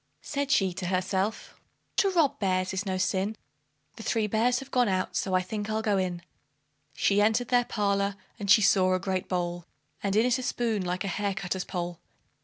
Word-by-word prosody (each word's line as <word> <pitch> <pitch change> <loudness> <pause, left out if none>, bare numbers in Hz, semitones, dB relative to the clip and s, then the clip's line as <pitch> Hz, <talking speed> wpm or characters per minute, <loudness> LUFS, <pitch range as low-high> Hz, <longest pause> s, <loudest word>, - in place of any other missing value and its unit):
Said 285 -1 -2
she 190 -9 +3
to 180 0 -4
herself, 190 +3 -2 0.4
"To 395 - +4
rob 330 -7 +2
bears 185 -1 0
is 195 +2 -3
no 190 -1 -1
sin; 190 +3 0 0.6
The - - -8
three 225 -2 0
bears 225 +4 +2
have 270 +1 -7
gone 250 -2 +3
out, 185 -1 -1
so 190 -2 0
I 185 - +2
think 210 +2 -4
I'll 220 0 -1
go 205 -3 +2
in." 175 -2 -2 0.7
She 200 +1 +3
entered 220 +3 +2
their 245 -1 +3
parlor, 200 -2 0 0.2
and 200 -1 -4
she 215 +1 +7
saw 185 -2 +4
a - - 0
great 190 -1 -2
bowl, 175 -1 -2 0.3
And 200 -1 -1
in 220 +2 +4
it 250 +1 +2
a - - -3
spoon 235 -5 -1
like 180 +1 -2
a - - -3
hair 200 +1 -1
cutter's 190 -2 -3
pole. 175 -2 -4
200 Hz, 205 wpm, -28 LUFS, 185-220 Hz, 0.7 s, she